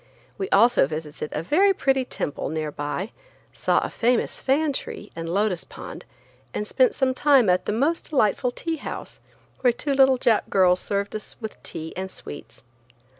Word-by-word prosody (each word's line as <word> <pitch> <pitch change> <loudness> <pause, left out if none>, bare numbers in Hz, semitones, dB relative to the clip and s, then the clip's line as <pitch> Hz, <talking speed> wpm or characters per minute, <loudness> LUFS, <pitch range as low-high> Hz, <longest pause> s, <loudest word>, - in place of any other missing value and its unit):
We 390 -1 -4
also 230 - +5
visited 150 0 -5
a 150 - -3
very 385 - +4
pretty 270 -4 +1
temple 145 - -4
near 155 -1 -3
by, 145 +9 -4 0.4
saw - - +2
a - - -3
famous 240 +1 0
fan 285 +2 +2
tree 210 -5 -5
and 165 0 -5
a - - -2
lotus 195 -1 0
pond, - - -10 0.5
and 210 - -1
spent 255 +4 +3
some 260 -1 +1
time 260 -7 +4
at 180 0 0
a - - +3
most 285 +10 0
delightful 250 -3 +2
tea 325 +6 -3
house, - - -7 0.4
where 250 -2 +4
two 275 +4 -2
little 265 -1 +5
"Jap" 235 -4 +2
girls 185 -2 +4
served 200 +2 -2
us 215 - -6
with 220 -2 -7
tea 160 0 -6
and 190 +1 -4
sweets. 145 - -10
220 Hz, 175 wpm, -24 LUFS, 180-270 Hz, 0.5 s, also